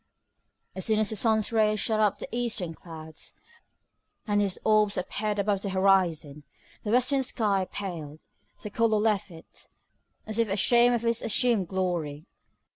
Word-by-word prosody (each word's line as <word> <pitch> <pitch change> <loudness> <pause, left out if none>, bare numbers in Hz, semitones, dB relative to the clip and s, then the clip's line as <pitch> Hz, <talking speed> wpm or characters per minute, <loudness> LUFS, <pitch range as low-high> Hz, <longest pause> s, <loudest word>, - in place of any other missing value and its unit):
As 190 - -4
soon 220 +2 +2
as 215 -1 +1
the - - -3
sun's 220 0 +1
rays 215 -2 +2
shot 220 +1 0
up 210 -2 +3
into - - -7
the - - -8
eastern 220 -8 -2
clouds, 160 -2 -11 0.9
and 205 -1 +1
his 195 -2 -1
orb 215 -1 +4
appeared 210 +3 -2
above 200 -1 0
the 200 - -3
horizon, 185 -6 +1 0.4
the 210 - -4
western 255 +4 +2
sky 205 -7 0
paled, 160 -6 -6 0.4
the 210 - -6
colour 225 0 +2
left 210 -1 +1
it, 165 -2 -13 0.6
as 215 +1 -4
if 230 -2 +2
ashamed 240 +5 +4
of 235 0 -3
its 230 0 +1
assumed 225 -4 +1
glory. 170 -5 -3
205 Hz, 160 wpm, -27 LUFS, 185-220 Hz, 0.9 s, orb